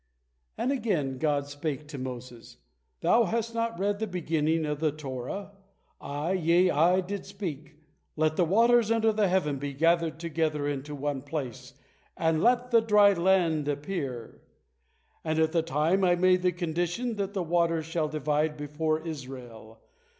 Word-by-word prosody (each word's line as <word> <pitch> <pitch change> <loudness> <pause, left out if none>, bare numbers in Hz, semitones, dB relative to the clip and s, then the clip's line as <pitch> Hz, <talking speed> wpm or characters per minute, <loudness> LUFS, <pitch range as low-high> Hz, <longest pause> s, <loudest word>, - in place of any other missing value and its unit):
And 260 - 0
again 175 - -1
God 145 -2 +1
spake 145 0 -5
to 145 -3 -7
Moses: 125 -2 -8 0.4
"Thou 235 0 +4
has 230 +4 -2
not 230 -3 -2
read 200 +2 0
the 220 - -2
beginning 160 -3 0
of 150 -1 -3
the 155 -1 +1
Torah. 140 +6 -6 0.5
I, 145 +5 -3
yea, 180 0 +3
I, 175 +5 +3
did 195 +2 -5
speak, 160 -7 -6 0.4
'Let 155 0 +1
the 180 - +3
waters 230 +5 +4
under 225 -1 +3
the 210 -1 +2
heaven 150 -7 0
be 140 0 -4
gathered 165 +1 +2
together 155 -3 -1
unto 145 +1 -4
one 145 -1 -3
place, 130 -3 -6 0.4
and 160 -1 +1
let 245 +2 +2
the 230 -1 +6
dry 210 -2 +5
land 170 -4 +2
appear,' 145 -5 -4 0.8
and 155 0 -1
at 160 0 +2
that 165 -1 0
time 165 +6 +1
I 175 -1 +4
made 185 +1 +3
the 180 0 +2
condition 175 +7 -2
that 200 0 -3
the 190 - 0
waters 165 -1 +1
shall 160 -1 -1
divide 150 0 0
before 155 +2 -2
Israel. 125 -7 -9
160 Hz, 160 wpm, -28 LUFS, 145-190 Hz, 0.8 s, the